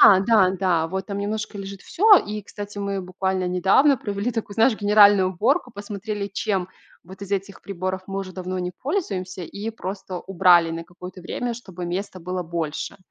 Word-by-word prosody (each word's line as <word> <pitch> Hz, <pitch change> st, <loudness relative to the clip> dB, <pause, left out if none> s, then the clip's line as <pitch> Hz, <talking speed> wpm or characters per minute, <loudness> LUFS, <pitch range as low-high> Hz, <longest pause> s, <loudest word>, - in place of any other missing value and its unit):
Да-да-да, 190 Hz, -4 st, +5 dB
вот 190 Hz, +2 st, -3 dB
там 200 Hz, -1 st, -4 dB
немножко 210 Hz, +1 st, -3 dB
лежит 195 Hz, 0 st, -7 dB
всё. 415 Hz, +2 st, +6 dB
И, 210 Hz, 0 st, -5 dB
кстати, 205 Hz, 0 st, -8 dB
мы 200 Hz, -1 st, -2 dB
буквально 185 Hz, 0 st, -2 dB
недавно 195 Hz, +11 st, +4 dB
провели 205 Hz, +3 st, -2 dB
такую, 215 Hz, -2 st, -4 dB
знаешь, 225 Hz, +2 st, +4 dB
генеральную 205 Hz, -2 st, +6 dB
уборку, 250 Hz, -, +1 dB
посмотрели 205 Hz, 0 st, -5 dB
чем 190 Hz, -2 st, -1 dB, 0.4 s
вот 190 Hz, +3 st, -13 dB
из 200 Hz, -, -8 dB
этих 195 Hz, 0 st, -3 dB
приборов 185 Hz, -1 st, -3 dB
мы 195 Hz, 0 st, -3 dB
уже 185 Hz, -1 st, -7 dB
давно 185 Hz, 0 st, -4 dB
не 180 Hz, 0 st, -2 dB
пользуемся, 195 Hz, -, -2 dB
и 200 Hz, +6 st, -6 dB
просто 190 Hz, -3 st, -6 dB
убрали 175 Hz, -3 st, +4 dB
на 165 Hz, 0 st, -5 dB
какое-то 180 Hz, +2 st, -11 dB
время, 240 Hz, +7 st, -3 dB
чтобы 190 Hz, -7 st, -8 dB
места 185 Hz, +2 st, -4 dB
было 180 Hz, +1 st, -3 dB
больше. 165 Hz, +1 st, -4 dB
195 Hz, 170 wpm, -23 LUFS, 185-205 Hz, 0.4 s, всё